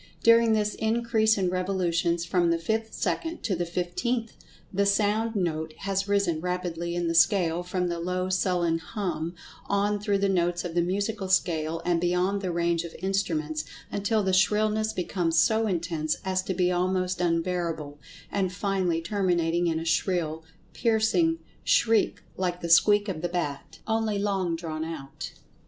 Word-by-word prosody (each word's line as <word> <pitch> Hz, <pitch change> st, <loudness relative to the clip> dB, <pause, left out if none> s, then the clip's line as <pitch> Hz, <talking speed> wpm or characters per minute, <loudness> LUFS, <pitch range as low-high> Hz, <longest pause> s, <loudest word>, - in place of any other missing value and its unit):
During 230 Hz, -1 st, +6 dB
this 210 Hz, -1 st, +1 dB
increase 220 Hz, -1 st, +2 dB
in 185 Hz, -2 st, +1 dB
revolutions 175 Hz, -2 st, 0 dB
from 175 Hz, 0 st, +2 dB
the 170 Hz, -, +2 dB
fifth 220 Hz, +6 st, -2 dB
second 335 Hz, 0 st, -2 dB
to 205 Hz, -4 st, 0 dB
the 175 Hz, 0 st, -2 dB
fifteenth, 220 Hz, +7 st, -2 dB, 0.4 s
the 200 Hz, +1 st, +2 dB
sound 215 Hz, +3 st, +1 dB
note 160 Hz, -4 st, -2 dB
has 195 Hz, 0 st, -1 dB
risen 200 Hz, -6 st, +1 dB
rapidly 175 Hz, -1 st, -3 dB
in 175 Hz, -1 st, -1 dB
the 165 Hz, -, 0 dB
scale 170 Hz, 0 st, +3 dB
from 180 Hz, 0 st, -2 dB
the 170 Hz, -1 st, -3 dB
low 180 Hz, +2 st, -1 dB
sullen 180 Hz, -3 st, +1 dB
"hum," 175 Hz, -3 st, -4 dB, 0.3 s
on 205 Hz, +1 st, +1 dB
through 205 Hz, -1 st, +1 dB
the 200 Hz, 0 st, +1 dB
notes 175 Hz, -2 st, 0 dB
of 170 Hz, -, -4 dB
the 175 Hz, -, +2 dB
musical 200 Hz, +3 st, -1 dB
scale, 165 Hz, -3 st, +1 dB
and 175 Hz, -1 st, +1 dB
beyond 180 Hz, +3 st, +1 dB
the 185 Hz, -2 st, -2 dB
range 170 Hz, 0 st, 0 dB
of 170 Hz, -, -9 dB
instruments, 160 Hz, -5 st, -1 dB, 0.3 s
until 205 Hz, +1 st, 0 dB
the 190 Hz, -1 st, 0 dB
shrillness 215 Hz, +3 st, +2 dB
becomes 175 Hz, -3 st, -1 dB
so 220 Hz, +7 st, +3 dB
intense 165 Hz, -4 st, -1 dB
as 185 Hz, 0 st, +1 dB
to 190 Hz, 0 st, -3 dB
be 180 Hz, 0 st, +2 dB
almost 185 Hz, 0 st, 0 dB
unbearable, 165 Hz, -4 st, -1 dB, 0.3 s
and 190 Hz, -2 st, 0 dB
finally 185 Hz, -4 st, -1 dB
terminating 175 Hz, -2 st, +1 dB
in 165 Hz, -1 st, 0 dB
a 165 Hz, -, -5 dB
shrill, 165 Hz, -1 st, 0 dB, 0.3 s
piercing 230 Hz, +9 st, +2 dB, 0.3 s
shriek 225 Hz, -2 st, +2 dB
like 180 Hz, -1 st, -2 dB
the 170 Hz, -, -4 dB
"squeak" 205 Hz, +5 st, +5 dB
of 175 Hz, -6 st, -3 dB
the 175 Hz, -, -1 dB
bat, 165 Hz, -6 st, -4 dB
only 220 Hz, -2 st, 0 dB
long 195 Hz, -4 st, 0 dB
drawn 160 Hz, -2 st, -4 dB
out. 160 Hz, -4 st, -7 dB
180 Hz, 160 wpm, -27 LUFS, 170-205 Hz, 0.4 s, During